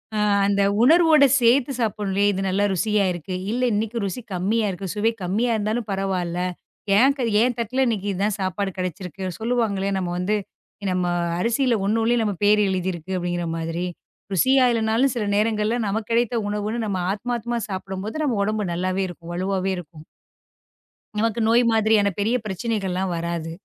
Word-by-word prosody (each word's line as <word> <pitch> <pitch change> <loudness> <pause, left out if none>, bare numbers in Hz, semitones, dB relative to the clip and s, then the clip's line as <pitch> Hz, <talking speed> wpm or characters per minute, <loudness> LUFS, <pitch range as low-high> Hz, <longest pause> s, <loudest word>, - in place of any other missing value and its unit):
அ - - 0 0.3
அந்த 200 0 +2 0.2
உணர்வோடு 315 +1 +6 0.2
சேர்த்துச் 250 +2 +3
சாப்பிடணும். 205 -2 0
இது 195 -1 -2
நல்லா 190 +2 +1
ருசியா 210 +2 +1
இருக்கு. 175 +1 -5 0.2
இல்ல 245 +2 -1
இன்னைக்கு 220 +3 -1
ருசி 195 +6 -4
கம்மியா 210 +5 0
இருக்கு. 190 +1 -5
சுவை 215 +2 +2
கம்மியா 210 +7 0
இருந்தாலும் 215 +2 -2
பரவாயில்ல, 185 -3 -2 0.6
ஏன் 265 +5 +5 0.3
என் 245 0 +1
தட்டுல 255 +4 0
இன்னைக்கு 205 -4 -1
இது 190 - -4
தான் 210 0 -1
சாப்பாடு 190 +1 -1
கிடைச்சிருக்கு 185 0 -4
சொல்லுவாங்கள? 225 -4 0
நம்ம 180 -2 -3
வந்து 195 +4 0 0.6
நம்ம 180 -1 0 0.3
அரிசியில 235 +4 +2
ஒண்னோணுல 225 +3 +2
நம்ம 210 -2 0
பேர் 210 +1 +5
எழுதி 190 -1 -1
இருக்கு 175 +3 -5
அப்டிங்கிற 175 -1 -2
மாதிரி. 165 +2 -3 0.5
ருசியா 260 +7 +4
இல்லன்னாலும் 230 +3 +1
சில 235 - -1
நேரங்கள்ல 215 +1 +1
நமக்குக் 215 +3 -3
கிடைத்த 240 +1 +1
உணவுன்னு 210 +2 -2
நம்ம 195 -3 -2
ஆத்மாத்மா 235 +3 -2
சாப்பிடும்போது 195 +8 -4
நம்ம 245 -8 0
உடம்பு 210 -3 -1
நல்லாவே 185 +2 -1
இருக்கும், 170 -1 -10
வலுவாவே 190 +1 -1
இருக்கும். 160 -2 -10 1.2
நமக்கு 230 +1 0
நோய் 235 +2 +5
மாதிரியான 220 -2 +3
பெரிய 220 +4 +1
பிரச்சனைகள்ல்லாம் 190 -3 -2
வராது. 170 -1 -3
205 Hz, 150 wpm, -23 LUFS, 185-230 Hz, 1.2 s, உணர்வோடு